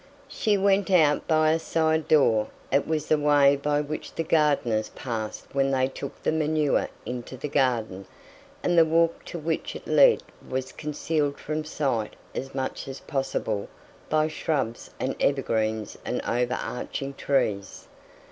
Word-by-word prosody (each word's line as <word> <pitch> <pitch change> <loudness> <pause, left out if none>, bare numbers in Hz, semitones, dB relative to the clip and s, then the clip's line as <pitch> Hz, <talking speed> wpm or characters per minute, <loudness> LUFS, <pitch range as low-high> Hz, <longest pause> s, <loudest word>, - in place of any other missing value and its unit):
She 210 -2 +1
went 195 0 +2
out 155 -6 +4
through 155 -1 +3
a 155 +1 +3
side 160 -1 +1
door 115 -8 +4 0.2
it 140 - +2
was 155 -2 -1
the 155 - +2
way 145 -1 +5
by 145 +1 0
which 150 +1 -6
the 165 - -1
gardeners 145 -9 +2
passed 110 -4 -5
when 135 0 +2
they 130 -1 +2
took 135 +1 -8
the - - +2
manure 155 -2 +1 0.2
into 125 +1 -6
the 140 - -4
garden 115 -9 0 0.6
and 175 - +2
the 165 - +8
walk 165 +1 +2
to - - -6
which 160 0 -3
it - - -8
led - - +5 0.3
was 130 0 -3
concealed 150 -1 -2
from 155 +1 -3
sight 135 -8 -2 0.2
as 135 0 -5
much 130 0 -3
as 135 0 -6
possible 135 -7 -2 0.4
by 155 0 +3
shrubs 145 -7 -2
and 130 - -1
evergreens 110 -6 0
and - - -2
over 125 +1 0
arching 135 +2 -4
trees. 105 -9 -1
145 Hz, 155 wpm, -26 LUFS, 125-155 Hz, 0.6 s, the